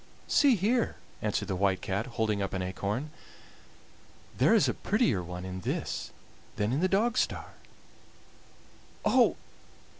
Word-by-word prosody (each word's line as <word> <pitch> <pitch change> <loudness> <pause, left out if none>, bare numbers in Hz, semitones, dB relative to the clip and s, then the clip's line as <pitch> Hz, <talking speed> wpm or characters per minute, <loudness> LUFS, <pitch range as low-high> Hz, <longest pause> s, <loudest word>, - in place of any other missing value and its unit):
"See 280 -5 +5
here," 225 +5 +1 0.3
answered 105 -1 -1
the 95 - -1
White 95 0 +1
Cat, 100 +6 -2
holding 110 -2 +1
up 95 - -2
an 95 -1 -1
acorn; 100 +10 -3 1.2
"there - - +4
is - - +4
a - - +1
prettier 90 - +1
one 90 +1 -6
in 95 0 -5
this - - -3 0.5
than 105 +3 0
in 140 - +1
the 185 +2 +2
Dogstar!" 215 +4 0 1.5
"Oh! - - +4
105 Hz, 130 wpm, -29 LUFS, -, 1.5 s, See